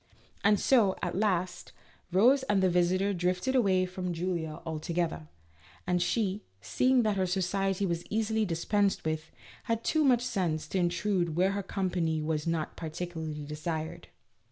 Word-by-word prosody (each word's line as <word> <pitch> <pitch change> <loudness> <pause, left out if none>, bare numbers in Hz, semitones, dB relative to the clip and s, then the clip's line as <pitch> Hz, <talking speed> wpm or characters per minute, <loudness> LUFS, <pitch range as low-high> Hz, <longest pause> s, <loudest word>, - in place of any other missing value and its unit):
And 205 0 +4
so, 220 -8 +4
at 175 - -1
last, 185 -3 -1 0.4
Rose 245 +10 +5
and 195 -2 +3
the 185 - +3
visitor 185 +3 +2
drifted 180 +7 0
away 190 -7 +3
from 180 -1 -4
Julia 165 -2 -3
altogether, 160 - -2 0.6
and 180 0 +1
she, 200 +2 0 0.2
seeing 255 - +2
that 210 -2 +1
her 190 -1 +1
society 195 +1 0
was 170 -2 -2
easily 220 0 0
dispensed 200 +2 0
with, 155 0 -2 0.4
had 230 0 -1
too 315 -1 +2
much 250 -4 +4
sense 185 -11 -1
to 190 - 0
intrude 175 -1 0
where 185 +3 +3
her 200 0 -2
company 180 -5 -1
was 155 0 -2
not 165 -2 -2
partic 175 +2 -5
ularly 155 -2 -5
desired. 155 +1 -4
180 Hz, 155 wpm, -29 LUFS, 165-200 Hz, 0.6 s, Rose